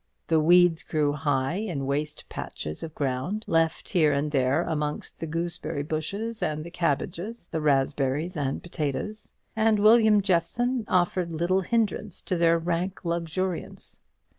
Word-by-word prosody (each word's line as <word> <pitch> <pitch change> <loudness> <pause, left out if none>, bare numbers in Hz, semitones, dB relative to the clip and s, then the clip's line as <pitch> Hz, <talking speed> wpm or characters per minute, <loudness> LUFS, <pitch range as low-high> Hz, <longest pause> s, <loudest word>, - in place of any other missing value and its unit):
The 160 -1 +3
weeds 175 +1 +5
grew 150 -2 0
high 145 +1 0
in 175 -10 -3
waste 145 +2 -3
patches 75 0 -6
of 160 -1 -7
ground, 145 +10 -2
left 165 -1 +1
here 160 -6 +4
and 145 +1 0
there 135 +3 +2
amongst 150 -3 -3
the 165 - -4
gooseberry 165 -2 -3
bushes 200 +10 -3
and 155 0 -1
the 170 - -9
cabbages, 175 +6 -2
the 160 - -2
raspberries 140 +3 +1
and 140 -3 -2
potatoes; 175 +6 -4 0.2
and 220 0 +3
William 215 0 +6
Jeffson 210 +6 +1
offered 175 -1 +1
little 175 +4 +1
hindrance 215 -1 -1
to 185 - -1
their 170 -1 +4
rank 175 +3 -2
luxuriance. 170 +2 -3
170 Hz, 140 wpm, -26 LUFS, 150-190 Hz, 0.2 s, William